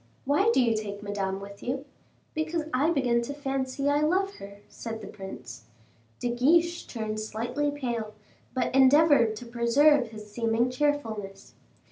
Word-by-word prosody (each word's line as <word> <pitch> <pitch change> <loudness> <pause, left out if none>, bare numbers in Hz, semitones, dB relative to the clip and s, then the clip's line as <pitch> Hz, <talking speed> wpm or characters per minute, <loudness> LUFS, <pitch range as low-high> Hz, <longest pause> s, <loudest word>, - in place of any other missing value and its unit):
Why 295 +11 +3
do - - +3
you 235 -3 +3
take 205 -1 -5
Madame 195 -2 -2
with 200 0 -10
you?" 265 +3 -3 0.5
"Because 315 +1 -1
I 275 +5 +3
begin 250 -7 +2
to 280 +4 -5
fancy 270 -1 -2
I 290 +1 +3
love 380 +6 +1
her," 200 +1 -11
said 225 -1 -7
the 210 - -9
prince. 130 - -9 0.5
De 245 - -1
Guiche 335 +8 +2
turned 215 -2 -4
slightly 230 +7 -2
pale, 235 -7 -4 0.4
but 255 - 0
endeavored 270 -3 +5
to 245 - -8
preserve 245 +4 +4
his 215 -1 -11
seeming 230 +2 +1
cheerfulness. 230 -8 -2
245 Hz, 150 wpm, -27 LUFS, 215-290 Hz, 0.5 s, endeavored